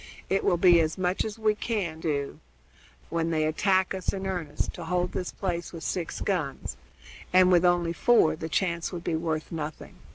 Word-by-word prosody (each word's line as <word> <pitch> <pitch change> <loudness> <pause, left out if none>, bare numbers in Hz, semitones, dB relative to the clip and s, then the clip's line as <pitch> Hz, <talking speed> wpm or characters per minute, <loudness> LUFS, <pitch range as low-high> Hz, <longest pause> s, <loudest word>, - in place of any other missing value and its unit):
It 195 - +2
will 175 - +3
be 175 -1 +6
as 160 0 -1
much 185 0 0
as 215 -1 -5
we 215 -1 +2
can 205 -7 -3
do, 145 -4 -2 0.7
when 165 0 0
they 155 -2 +1
attack 190 +5 +2
us 190 -1 -1
in 195 -1 -5
earnest, 175 -6 -3
to 170 - -7
hold 180 +1 0
this 180 -2 -3
place 175 -3 -3
with 165 -2 -8
six 175 -3 -3
guns, 160 -9 -2 0.6
and 185 0 +6
with 175 -1 +5
only 175 -1 +3
four 170 -8 +4
the 160 +1 -6
chance 170 -1 0
would 175 -2 -6
be 170 - -1
worth 160 -1 -2
nothing. 155 -2 -6
175 Hz, 190 wpm, -27 LUFS, 160-185 Hz, 0.7 s, be